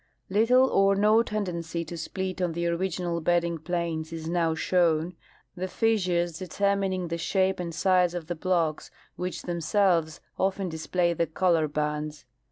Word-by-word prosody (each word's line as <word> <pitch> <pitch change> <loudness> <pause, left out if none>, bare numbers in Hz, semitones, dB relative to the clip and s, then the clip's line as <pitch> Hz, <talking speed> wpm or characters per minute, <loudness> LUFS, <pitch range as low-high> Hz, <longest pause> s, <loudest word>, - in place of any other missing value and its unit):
Little 245 +6 +5
or 195 -4 +3
no 215 +3 +4
tendency 170 -7 -3
to 170 - -7
split 185 +3 -4
on 175 -2 0
the 170 +1 -2
original 170 0 -1
bedding 170 0 +1
planes 165 -1 -3
is 160 -1 -6
now 165 -1 +1
shown, 170 0 +1 0.4
the 185 +1 -3
fissures 180 -6 0
determining 190 -1 -1
the 170 0 -3
shape 190 +2 +1
and 175 -1 -3
size 180 +1 +2
of 175 -2 -4
the 175 - -3
blocks, 170 -2 -1 0.3
Avhich 180 0 -4
themselves 170 -1 +1 0.2
often 190 0 0
display 170 +2 0
the 170 0 0
color 165 -2 +2
bands. 150 -1 -3
175 Hz, 150 wpm, -27 LUFS, 165-190 Hz, 0.4 s, Little